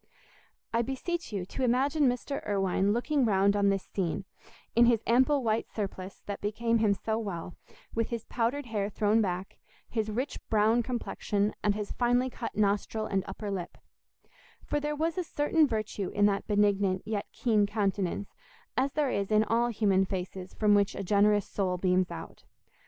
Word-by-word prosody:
I 230 Hz, -, +3 dB
beseech 270 Hz, +8 st, -3 dB
you 195 Hz, -4 st, -3 dB
to 260 Hz, +7 st, -4 dB
imagine 270 Hz, +4 st, +3 dB
Mr. 250 Hz, +3 st, -3 dB
Irwine 195 Hz, -1 st, +1 dB
looking 265 Hz, +5 st, +1 dB
round 200 Hz, -2 st, +3 dB
on 200 Hz, -1 st, +3 dB
this 195 Hz, -1 st, 0 dB
scene, 185 Hz, -1 st, -3 dB, 0.5 s
in 235 Hz, +1 st, +6 dB
his 230 Hz, -2 st, +3 dB
ample 260 Hz, +4 st, +3 dB
white 225 Hz, 0 st, 0 dB
surplice 195 Hz, -2 st, -5 dB
that 200 Hz, -1 st, -5 dB
became 230 Hz, +3 st, 0 dB
him 210 Hz, -2 st, +3 dB
so 220 Hz, +2 st, -2 dB
well, 180 Hz, -5 st, -5 dB, 0.4 s
with 230 Hz, 0 st, 0 dB
his 235 Hz, -2 st, -4 dB
powdered 250 Hz, +4 st, -1 dB
hair 210 Hz, -4 st, -2 dB
thrown 215 Hz, +2 st, +2 dB
back, 185 Hz, -1 st, -3 dB, 0.3 s
his 220 Hz, -2 st, -2 dB
rich 250 Hz, +6 st, -3 dB
brown 220 Hz, +2 st, +3 dB
complexion, 215 Hz, -4 st, -1 dB
and 205 Hz, -1 st, +2 dB
his 210 Hz, -1 st, -4 dB
finely 245 Hz, +1 st, +1 dB
cut 230 Hz, -3 st, -6 dB
nostril 210 Hz, +1 st, +1 dB
and 195 Hz, -3 st, 0 dB
upper 200 Hz, +1 st, -5 dB
lip; 185 Hz, -3 st, -5 dB, 0.9 s
for 295 Hz, -, -1 dB
there 295 Hz, +1 st, -2 dB
was 325 Hz, +4 st, -1 dB
a -, -, 0 dB
certain 305 Hz, 0 st, +2 dB
virtue 215 Hz, -5 st, -2 dB
in 205 Hz, -, +2 dB
that 200 Hz, -1 st, +1 dB
benignant 200 Hz, -2 st, +2 dB
yet 215 Hz, -1 st, -2 dB
keen 215 Hz, -4 st, +2 dB
countenance 200 Hz, -2 st, -1 dB, 0.4 s
as 270 Hz, +1 st, +1 dB
there 290 Hz, -3 st, +1 dB
is 200 Hz, -1 st, -1 dB
in 215 Hz, 0 st, +5 dB
all 230 Hz, +2 st, +2 dB
human 200 Hz, -4 st, +2 dB
faces 185 Hz, -1 st, -5 dB
from 210 Hz, -1 st, +3 dB
which 200 Hz, -1 st, +3 dB
a -, -, -4 dB
generous 205 Hz, +1 st, +3 dB
soul 185 Hz, -3 st, -1 dB
beams 180 Hz, 0 st, +2 dB
out. 80 Hz, 0 st, -9 dB
210 Hz, 175 wpm, -29 LUFS, 200-240 Hz, 0.9 s, in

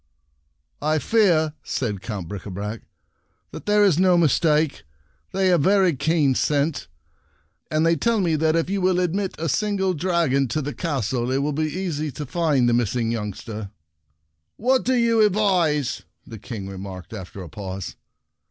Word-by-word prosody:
"I 155 Hz, +1 st, +1 dB
fear," 165 Hz, -5 st, +2 dB
said 105 Hz, -7 st, -3 dB
Count 100 Hz, -5 st, -5 dB
Brica 100 Hz, +2 st, -7 dB
brac, 105 Hz, +4 st, -5 dB, 0.7 s
"that -, -, -9 dB
there 210 Hz, 0 st, +4 dB
is 175 Hz, -5 st, +3 dB
no 185 Hz, -1 st, +5 dB
mistake. 155 Hz, -, +2 dB, 0.5 s
They 190 Hz, -1 st, +1 dB
have 175 Hz, -4 st, +4 dB
very 190 Hz, -1 st, +3 dB
keen 145 Hz, 0 st, +2 dB
scent, 145 Hz, -, 0 dB, 0.8 s
and 155 Hz, +1 st, +1 dB
they 165 Hz, 0 st, +4 dB
tell 230 Hz, +4 st, +1 dB
me 170 Hz, -4 st, +1 dB
that 160 Hz, +1 st, +2 dB
if 165 Hz, -, +1 dB
you 195 Hz, +1 st, -1 dB
will 180 Hz, 0 st, +2 dB
ad 180 Hz, -2 st, 0 dB
mit 195 Hz, -1 st, -2 dB
a 165 Hz, -, -2 dB
single 195 Hz, +2 st, 0 dB
dragon 160 Hz, -5 st, +1 dB
to 140 Hz, +7 st, -2 dB
the 145 Hz, +1 st, -4 dB
castle 125 Hz, -, -2 dB
it 135 Hz, +2 st, 0 dB
will 150 Hz, +1 st, -1 dB
be 155 Hz, +1 st, -1 dB
easy 155 Hz, -3 st, -3 dB
to 150 Hz, -, -5 dB
find 145 Hz, -4 st, +1 dB
the 120 Hz, -, +3 dB
miss 120 Hz, -2 st, +1 dB
ing 115 Hz, -2 st, 0 dB
youngster." 105 Hz, -1 st, -5 dB, 0.4 s
" 75 Hz, +1 st, -51 dB
What 260 Hz, 0 st, +4 dB
do 260 Hz, -, +2 dB
you 230 Hz, -2 st, +3 dB
advise? 180 Hz, -, +1 dB
" -, -, -48 dB
the 115 Hz, -5 st, -10 dB
King 105 Hz, -3 st, -7 dB
remarked, 95 Hz, 0 st, -8 dB
after 95 Hz, -2 st, -8 dB
a -, -, -9 dB
pause. 95 Hz, +1 st, -6 dB
150 Hz, 175 wpm, -23 LUFS, 115-180 Hz, 0.8 s, no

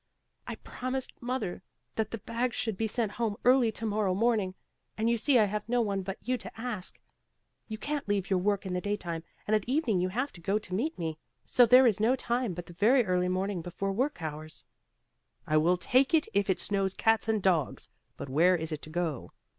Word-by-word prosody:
"I -, -, -4 dB
promised 255 Hz, +1 st, -5 dB
mother 240 Hz, -8 st, -3 dB, 0.3 s
that 220 Hz, -1 st, -1 dB
the 230 Hz, -, -4 dB
bag 235 Hz, +3 st, -2 dB
should 220 Hz, -3 st, -1 dB
be 220 Hz, +3 st, -1 dB
sent 220 Hz, -1 st, -1 dB
home 225 Hz, -2 st, -1 dB
early 250 Hz, -2 st, +5 dB
tomorrow 210 Hz, -3 st, -1 dB
morning, 210 Hz, -3 st, +1 dB, 0.4 s
and 220 Hz, +1 st, 0 dB
you -, -, +3 dB
see 250 Hz, +4 st, +3 dB
I 220 Hz, -, +5 dB
have 210 Hz, +2 st, -4 dB
no 245 Hz, 0 st, +2 dB
one 200 Hz, -4 st, 0 dB
but 190 Hz, 0 st, -5 dB
you 255 Hz, -1 st, +1 dB
to 225 Hz, -, -10 dB
ask. 225 Hz, -6 st, -3 dB, 0.7 s
You 220 Hz, -, -5 dB
can't 290 Hz, +3 st, -3 dB
leave 200 Hz, -2 st, 0 dB
your 190 Hz, -2 st, +2 dB
work 200 Hz, +1 st, 0 dB
in 185 Hz, -, -3 dB
the 180 Hz, -, -1 dB
daytime 180 Hz, -5 st, -3 dB, 0.2 s
and 215 Hz, -, +2 dB
at 215 Hz, -, +1 dB
evening 250 Hz, -, +1 dB
you 185 Hz, -, 0 dB
have 255 Hz, +9 st, -2 dB
to 175 Hz, -, -12 dB
go 195 Hz, +5 st, +1 dB
to 200 Hz, -3 st, -7 dB
meet 275 Hz, -, -1 dB
me; 160 Hz, -2 st, -4 dB, 0.3 s
so 245 Hz, -1 st, +5 dB
there 255 Hz, +3 st, +8 dB
is 220 Hz, -4 st, +3 dB
no 230 Hz, +5 st, +3 dB
time 240 Hz, -6 st, -1 dB
but 175 Hz, 0 st, -6 dB
the 175 Hz, -, -12 dB
very 230 Hz, +7 st, +4 dB
early 180 Hz, -1 st, +1 dB
morning 185 Hz, 0 st, -1 dB
before 180 Hz, +3 st, -3 dB
work 245 Hz, -, -1 dB
hours." 155 Hz, 0 st, -6 dB, 0.8 s
"I 155 Hz, -, +2 dB
will 170 Hz, +4 st, +3 dB
take 260 Hz, -, +3 dB
it 310 Hz, -, +2 dB
if 200 Hz, 0 st, +1 dB
it 190 Hz, -, +2 dB
snows 195 Hz, -2 st, 0 dB
cats 225 Hz, 0 st, +2 dB
and 220 Hz, -1 st, +2 dB
dogs; 175 Hz, -7 st, 0 dB, 0.3 s
but -, -, -6 dB
where 165 Hz, +7 st, +4 dB
is 160 Hz, -1 st, -3 dB
it 155 Hz, -, -4 dB
to -, -, -8 dB
go?" 160 Hz, -5 st, -3 dB
205 Hz, 220 wpm, -29 LUFS, 180-235 Hz, 0.8 s, there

